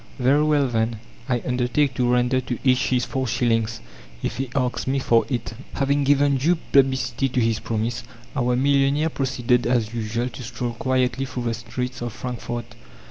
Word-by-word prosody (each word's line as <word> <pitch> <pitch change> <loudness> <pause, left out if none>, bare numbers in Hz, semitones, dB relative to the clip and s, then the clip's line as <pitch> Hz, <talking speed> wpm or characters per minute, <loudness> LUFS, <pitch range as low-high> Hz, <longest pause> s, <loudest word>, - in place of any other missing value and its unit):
Very 135 +3 +3
well, 150 -2 +3
then, 115 -1 0 0.3
I 120 -2 0
undertake 125 +3 +1
to 125 0 +1
render 125 +1 +2
to 125 -1 -4
each 130 0 +3
his 125 -2 +1
four 130 -1 -2
shillings 115 -1 0 0.4
if 120 - -2
he 135 -1 -2
asks 125 -2 -1
me 135 +1 +1
for 115 -3 +3
it." 120 -3 -3 0.2
Having 140 0 +1
given 140 0 +4
due 160 +7 +3 0.2
publicity 130 -1 +2
to 125 - 0
his 115 -2 +1
promise, 115 +2 -2 0.3
our 125 -2 +1
millionaire 140 +3 +2
proceeded 125 -4 0
as 120 -3 +1
usual 115 +2 -2
to 110 - -9
stroll 120 0 -4
quietly 130 +2 0
through 130 -2 -5
the 115 -1 0
streets 120 +3 -5
of 120 -2 -4
Frankfort. 120 -1 -5
125 Hz, 175 wpm, -23 LUFS, 120-135 Hz, 0.4 s, given